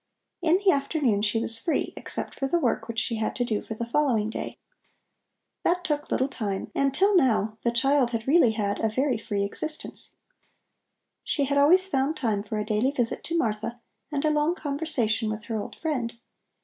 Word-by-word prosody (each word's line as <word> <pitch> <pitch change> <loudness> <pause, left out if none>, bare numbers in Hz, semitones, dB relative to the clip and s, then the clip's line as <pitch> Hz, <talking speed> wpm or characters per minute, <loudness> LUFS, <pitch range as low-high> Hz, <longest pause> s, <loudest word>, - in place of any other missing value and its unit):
In 340 +1 +4
the 395 -1 +4
afternoon 275 -7 +1
she 215 +2 +1
was 225 0 +1
free, 330 - -1
except - - -5
for 270 - -2
the 345 - +2
work 250 -9 0
which 230 -1 -6
she 225 0 0
had 220 - -2
to 245 - 0
do 215 -3 -1
for 220 - -6
the 235 - -3
following 235 -4 +1
day. - - -5 1.1
That 355 +1 +1
took 295 -2 -2
little 260 - +1
time 205 -8 -4
and 275 0 +2
till 390 +9 +3
now 220 - +2
the 235 - +1
child 265 +2 +3
had 230 0 -3
really 275 -6 +5
had 205 -2 -1
a 220 - +1
very 255 +1 0
free 200 -2 -2
existence. 305 +10 -4 1.1
She 285 - 0
had 280 +1 +1
always 355 +7 +6
found 280 -2 0
time 220 -8 0
for 215 +1 -4
a 210 - -1
daily 215 +4 +1
visit 245 -5 -2
to 335 - -1
Martha 225 -3 -1 0.3
and 285 0 -1
a 305 - +3
long 300 +3 +2
conversation 280 -8 0
with 215 0 -4
her 220 -1 -3
old - - -8
friend. 250 -8 -2
250 Hz, 195 wpm, -26 LUFS, 220-295 Hz, 1.1 s, always